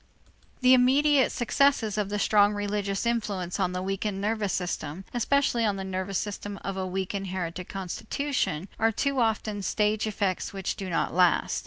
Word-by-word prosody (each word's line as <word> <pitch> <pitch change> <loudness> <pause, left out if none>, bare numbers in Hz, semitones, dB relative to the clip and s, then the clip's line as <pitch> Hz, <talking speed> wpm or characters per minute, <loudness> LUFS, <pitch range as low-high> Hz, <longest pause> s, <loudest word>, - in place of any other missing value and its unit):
The 255 0 +6
immediate 270 +2 +4
successes 240 -3 +2
of 210 -2 -1
the 205 - -1
strong 205 0 +4
religious 205 0 -2
influence 205 -6 -1
on 185 -2 +1
the 180 0 -3
weakened 195 +1 -2
nervous 210 -1 -1
system, 175 -1 -3
especially 245 0 +2
on 205 -3 +1
the 195 - -4
nervous 190 0 -3
system 205 -1 -4
of 195 - -3
a 190 -1 -2
weak 190 +1 -3
inherited 185 -3 -4
constitution, 195 - -2
are 225 0 +3
too 275 +4 0
often 215 -2 0
stage 210 +2 0
effects 200 -3 -2
which 195 -1 -3
do 190 -2 -5
not 165 - 0
last. 180 0 +3
205 Hz, 165 wpm, -27 LUFS, 190-225 Hz, -, The